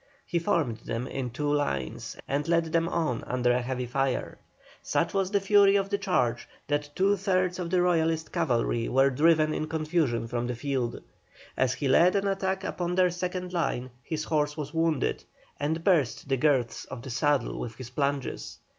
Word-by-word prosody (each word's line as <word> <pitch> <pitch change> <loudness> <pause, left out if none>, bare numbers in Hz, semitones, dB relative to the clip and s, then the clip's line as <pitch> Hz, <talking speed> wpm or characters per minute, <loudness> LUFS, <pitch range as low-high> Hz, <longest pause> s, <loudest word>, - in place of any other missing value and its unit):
He 170 - 0
formed 165 - 0
them 115 +1 -4
in 130 -1 -4
two 145 +4 -1
lines 70 - -2
and 145 +3 -1
led 170 0 +3
them 165 0 +2
on 160 -10 -1
under 125 -1 +1
a 125 +1 +2
heavy 125 0 -3
fire. 135 +1 -1 0.4
Such - - 0
was 195 -2 +1
the 200 0 +2
fury 200 0 +5
of 195 0 +1
the 200 - +1
charge 125 - 0 0.2
that 145 0 -1
two 195 +2 +3
thirds 185 -2 0
of 175 -2 -3
the 180 0 +2
Royalist 165 -2 +1
cavalry 120 -8 0
were 135 +1 +4
driven 155 +2 +3
in 155 - -2
confusion 155 -7 0
from 120 +1 -2
the 125 - -2
field. 125 -2 -2 0.5
As 130 0 +1
he 140 +1 -2
led 170 +8 +5
an 200 0 +1
attack 190 0 -1
upon 180 -2 -2
their 180 -1 +4
second 180 +1 -4
line 130 -7 -1
his 155 +2 -3
horse 150 -1 0
was 150 0 -5
wounded, 160 -3 0 0.4
and 160 +3 -1
burst 160 - +2
the 135 -1 +1
girths 130 -4 +1
of 115 - -8
the 130 - -6
saddle 145 +2 +1
with 115 -2 -5
his 130 0 -9
plunges. 140 0 -2
150 Hz, 185 wpm, -28 LUFS, 130-180 Hz, 0.5 s, fury